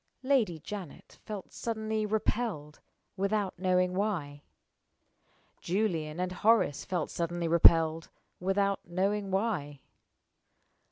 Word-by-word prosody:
Lady 250 -11 +2
Janet 180 +1 -9
felt 210 -3 -7
suddenly 220 -1 -2
repelled, 210 -8 -2 0.4
without 200 -1 -1
knowing 180 -1 +2
why. 175 -8 -2 1.2
Julian 170 -5 -1
and 180 0 -1
Horace 210 -6 +2
felt 180 -4 -2
suddenly 170 0 -2
repelled, 165 -1 +5 0.3
without 195 +2 +1
knowing 195 +3 -1
why. 190 - -1
185 Hz, 95 wpm, -30 LUFS, 165-210 Hz, 1.2 s, repelled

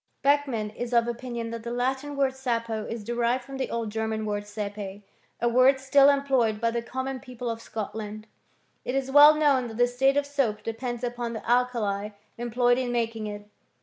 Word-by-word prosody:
Beck 285 +1 +4
mann 215 -5 -3
is 240 +3 -5
of 235 0 +4
opinion 235 -1 -4
that 230 0 -5
the 235 - -6
Latin 265 +4 -2
word 270 -1 +2
sapo 230 -4 -2
is 230 -2 -5
de 235 +3 -4
rived 240 +2 +1
from 270 +2 -8
the 265 - -2
old 230 -2 -3
German 220 0 -2
word 205 -1 -3
sepe, 205 -1 -6 0.4
a 240 - +1
word 255 +3 +5
still 275 +1 +5
employed 265 -6 +2
by 230 0 +1
the 235 0 -1
common 260 +2 -4
people 250 -2 -5
of 225 0 -6
Scotland.f 215 -1 -6 0.6
It 250 - -3
is 270 0 -1
well 295 +2 +9
known 280 -5 +3
that 225 -1 -8
the 245 - +5
state 265 +3 +2
of 285 - +2
soap 260 -7 -1
depends 240 +2 -4
upon 240 -1 -3
the 220 - -7
alkali 230 -5 +1 0.3
employed 245 +1 +1
in 250 -2 -2
making 230 -2 -1
it. 205 0 -7
240 Hz, 200 wpm, -26 LUFS, 220-260 Hz, 0.6 s, well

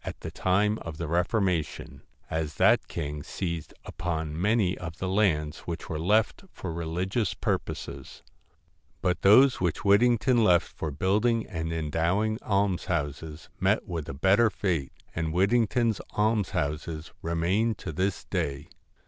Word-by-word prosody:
at - - -7
the - - -6
time 105 +4 +1
of 80 -2 -7
the 85 - -4
Reformation, 85 -2 -1 0.3
as 80 -2 -3
that - - +4
king 75 -2 -4
seized 85 +1 -4
upon 80 -2 -3
many 105 -2 +2
of 80 -2 -7
the 95 - -3
lands 85 -6 +1
which 85 0 -5
were 80 - -3
left 105 - +2
for 90 -3 -6
religious 90 +5 -2
purposes; 70 -1 -4 0.8
but 90 0 +1
those 125 +6 +6
which 90 +2 -1
Whittington 120 +4 +4
left 90 -5 +4
for 80 - -3
building 105 - +1
and 80 -4 -4
endowing 85 +7 0
almshouses 80 -6 -1
met - - +1
with 80 -4 -4
a - - -4
better 100 +9 +4
fate; 90 -7 -2 0.2
and 80 -1 -2
Whittington's 115 +3 +2 0.2
almshouses 80 -7 -1
remain 90 +7 +1
to - - -6
this 90 +2 -1
day. 70 0 -3
90 Hz, 135 wpm, -27 LUFS, 80-105 Hz, 0.8 s, those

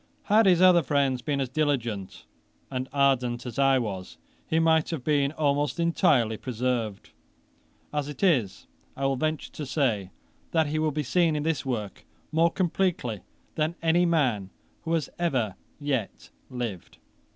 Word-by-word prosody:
Had 215 0 +4
his 180 -1 +5
other 180 -2 +7
friends 140 -3 +1
been 140 +2 -1
as 135 - 0
diligent 120 -8 -2 0.5
and 130 0 -3
ardent 130 -3 +1
as 125 +2 -5
I 135 -1 +5
was, 100 -7 -4 0.3
he 160 - 0
might 160 -1 +3
have 160 -7 -4
been 145 -1 +2
almost 145 +1 0
entirely 150 - +2
preserved. 120 -4 -3 0.8
As 145 -1 -2
it 150 - -7
is, 130 - +2 0.3
I 135 - -1
will 135 0 +2
venture 155 +2 -2
to 155 - -6
say 130 - 0 0.4
that 160 -1 +3
he 155 +1 -2
will 155 0 +2
be 150 0 -2
seen 165 +2 +2
in 150 - -1
this 160 -3 -1
work 110 -6 -4 0.3
more 165 +2 +4
completely 170 - -1 0.3
than 155 +2 -1
any 170 +2 +3
man 125 - +1 0.4
who 165 - -1
has 165 -3 0
ever 130 - 0 0.3
yet 135 -8 -3 0.2
lived. 120 -8 -5
140 Hz, 155 wpm, -27 LUFS, 125-160 Hz, 0.8 s, other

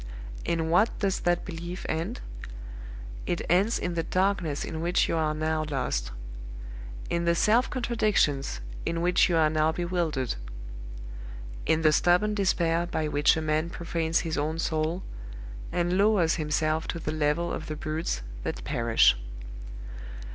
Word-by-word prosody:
In 165 -1 -1
what 200 +7 +3
does 195 -2 0
that 175 0 0
belief 175 0 -6
end? 160 - -3 1.1
It 175 - -1
ends 195 +6 +3
in 180 - -2
the 170 - 0
darkness 185 -3 0
in 160 -1 -5
which 175 +1 +2
you - - 0
are 155 -1 0
now 155 0 0
lost; 125 - -1 1.0
in 170 0 0
the 170 0 +3
self 225 +8 +3
contradictions 210 - 0 0.2
in 165 0 -2
which 180 +1 +3
you 170 - +2
are 160 -1 +5
now 155 0 +2
bewildered; 170 -6 -1 1.3
in 160 0 +2
the 155 - +6
stubborn 180 +7 +3
despair 175 -4 +1
by 155 -3 -1
which 145 +1 +3
a 160 - -2
man 155 +2 0
profanes 165 -1 -1
his 160 -3 -2
own 155 +2 -1
soul, 160 +2 -1 0.7
and 175 +2 +1
lowers 200 -6 +4
himself 155 0 0
to - - -3
the 155 - -3
level 155 +2 0
of 155 - -5
the 155 - -4
brutes 155 - -3 0.2
that - - -4
perish. 115 - +4
165 Hz, 145 wpm, -27 LUFS, 155-175 Hz, 1.3 s, the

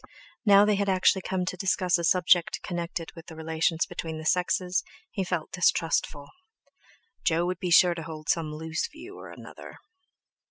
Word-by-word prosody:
Now 200 0 +7
they 210 -1 +2
had 200 0 0
actually 190 0 +3
come 185 0 -2
to 185 - -3
discuss 180 -1 +1
a - - -3
subject 175 0 +3
connected 170 -1 -4
with 165 - -12
the 160 - -10
relations 160 +1 0
between 160 -1 -6
the 155 - -8
sexes 180 +1 +1 0.3
he 195 - -2
felt 175 -3 -3
distrustful. 165 -4 0 1.0
Jo 170 +1 +2
would 180 +1 -3
be 180 - -3
sure 175 +1 +6
to 170 - -7
hold 155 -1 -9
some 160 -2 0
loose 160 +1 -3
view 350 +6 -11
or - - -11
other. - - -12
175 Hz, 170 wpm, -27 LUFS, 160-185 Hz, 1.0 s, Now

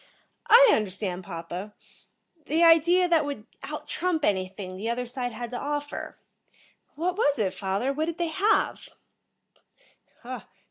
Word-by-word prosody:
"I - - +9
understand, 190 -3 -2
papa. 175 +5 -7 0.7
The 320 +3 +2
idea 340 +2 +6
that 335 -3 +3
would 285 -7 -5 0.2
out - - -7
trump 340 -4 -1
anything 190 -1 -2
the 210 +5 -4
other 245 +1 -2
side 245 0 -4
had 235 +1 -6
to 245 - -4
offer. 290 0 -4 0.8
What 350 +4 -1
was 290 -9 +2
it, 200 -5 0
father? 200 +7 -1
What 310 +3 -1
did 335 0 -4
they 340 -2 -1
have?" 390 +7 +1
260 Hz, 135 wpm, -26 LUFS, 200-330 Hz, 0.8 s, I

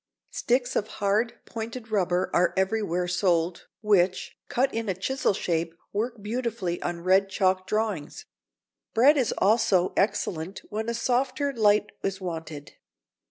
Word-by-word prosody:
Sticks 245 +1 0
of 210 - 0
hard, 215 +4 +1
pointed 225 0 -7
rubber 185 -3 +1
are 180 - +2
everywhere 190 -3 0
sold, 175 -1 0
which, 190 -4 +2
cut 265 +2 +1
in 225 -2 -2
a 190 - 0
chisel 260 +8 0
shape, 165 -3 -2 0.2
work 220 +1 -3
beautifully 220 -6 -2
on 175 -1 -3
red 190 +2 +4
chalk 185 -1 +1
drawings. 215 - -2 0.7
Bread 265 +7 +6
is 255 -6 +1
also 200 -4 +3
excellent 190 -3 -1
when 220 +2 -2
a 235 - -1
softer 260 +4 0
light 210 -3 +3
is 195 -1 -2
wanted. 160 -5 -7
205 Hz, 135 wpm, -26 LUFS, 180-230 Hz, 0.7 s, Bread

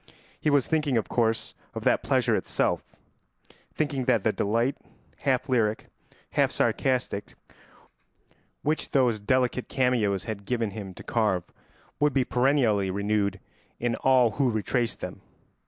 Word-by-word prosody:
He - - +1
was 145 -3 +3
thinking, 150 -5 +1
of 110 - -1
course, 115 -2 0 0.2
of - - -4
that - - +3
pleasure - - +2
itself; - - 0 0.9
thinking 140 -4 -1
that 115 -6 +2
the 110 - +3
delight, 115 +6 0 0.4
half 130 -2 0
lyric, 110 -4 0 0.4
half - - +3
sarcastic, 125 -6 0 1.3
which 155 +2 -1
those 125 -5 +3
delicate 125 +3 0
cameos 115 -8 +1
had 105 -2 -6
given 115 -2 -1
him 95 -3 -7
to - - -10
carve 105 -6 +1 0.6
would 150 -1 +3
be 135 -2 +2
perennially 125 -7 +2
renewed 100 0 0 0.4
in 120 0 0
all 130 -3 +4
who 135 +3 +1
retraced 115 +2 -1
them. - - -6
120 Hz, 135 wpm, -27 LUFS, 105-130 Hz, 1.3 s, all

